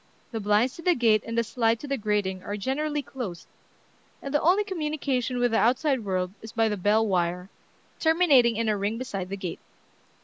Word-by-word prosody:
The 225 - -3
blinds 210 +4 +2
to - - -8
the 355 +1 +3
gate 225 -4 +3
and 230 0 -4
the 235 - +3
slide 225 0 0
to 290 - -7
the 275 - 0
grating 205 -5 -1
are 205 +2 -5
generally 290 +6 -2
closed, 230 -10 -7 0.7
and 275 - -7
the 295 - +2
only 370 +6 +4
communication 300 - -2
with 245 -1 +2
the 225 - +2
outside 260 +1 +2
world 185 -2 -1
is 220 - -9
by 225 -1 +2
the 210 - -1
bell 210 +3 +2
wire, 180 -1 -1 0.5
terminating 310 -8 +4
in 230 0 0
a 215 - +2
ring 205 +3 -2
beside 195 -7 -5
the 200 - -4
gate. 185 -3 -5
230 Hz, 200 wpm, -26 LUFS, 205-275 Hz, 0.7 s, only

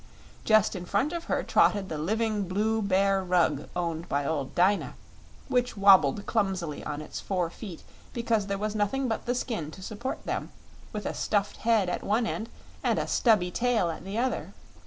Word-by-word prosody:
Just 215 -2 +4
in 180 -1 -5
front 265 - +1
of 340 -1 -4
her - - 0
trotted 200 -2 +3
the 155 -4 -4
living 215 +3 0
Blue 215 +4 0
Bear 195 -1 +2
Rug 170 -6 +1
owned 170 -1 -3
by 140 0 0
old 140 -3 -2
Dyna, 190 +3 +2 0.5
which 245 -2 0
wobbled 195 -2 +5
clumsily 190 -8 -1
on 150 0 -4
its - - -7
four 180 -4 -1
feet 190 -5 -9 0.3
because 230 -4 0
there 200 0 -1
was 210 +1 -2
nothing 220 +6 0
but 225 +1 -3
the 245 - +1
skin 220 - -3
to 190 +4 -11
support 225 +6 -5
them, - - -3 0.4
with 210 -1 -5
a - - -2
stuffed 205 -1 -1
head 220 -4 +2
at 180 - -2
one 220 +4 +1
end 225 +1 -3 0.3
and - - +2
a - - 0
stubby 210 -7 +3
tail 230 -6 +1
at 160 - -8
the 195 +3 -5
other. 255 +2 -2
200 Hz, 185 wpm, -28 LUFS, 180-225 Hz, 0.5 s, wobbled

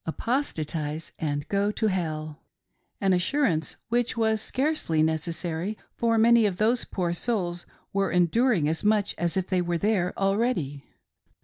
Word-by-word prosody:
would 160 - -4
"apostatise 160 - -2
and 145 -2 -2
go 200 +1 +1
to 220 - -2
hell;" 155 -6 -2 0.3
— - - -48
an 195 -1 +3
assurance 180 - +1
which 240 +1 0
was 220 -1 +2
scarcely 260 - 0
necessary, 165 +4 -2 0.2
for 230 -1 +1
many 230 0 +5
of 185 -3 -3
those 230 +4 +2
poor 175 -3 -2
souls 175 -3 -2 0.3
were 195 0 +1
endur 215 +7 +3
ing 150 -3 +1
as 160 +1 -1
much 210 -1 +2
as 175 +2 0
if 190 - 0
they 185 -1 0
were 175 -1 -1
there 190 -2 +1
already. 195 - 0
185 Hz, 155 wpm, -26 LUFS, 160-220 Hz, 0.3 s, many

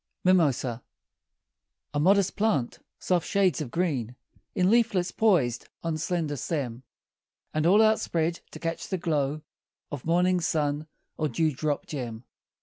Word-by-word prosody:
MIMOSA 140 -10 +2 1.1
A - - 0
modest 195 +4 +3
plant; 180 - 0 0.2
soft 180 -3 0
shades 195 -5 +2
of 140 - -4
green 135 -8 -1 0.4
In 185 +2 +3
leaflets 220 -6 +2
poised 155 - +2
on 165 -2 -2
slender 160 -2 -1
stem; 130 -6 -3 0.7
And 155 +1 +1
all 205 +5 +6
outspread 170 -6 +1
to - - -10
catch 165 0 -3
the 190 - -2
glow 155 -3 -1 0.5
Of 145 -4 -5
morning 180 +2 +2
sun 150 -1 0 0.3
or 155 -1 0
dew 160 0 +1
drop 145 +1 -2
gem. 120 -5 -5
160 Hz, 135 wpm, -27 LUFS, 145-180 Hz, 1.1 s, all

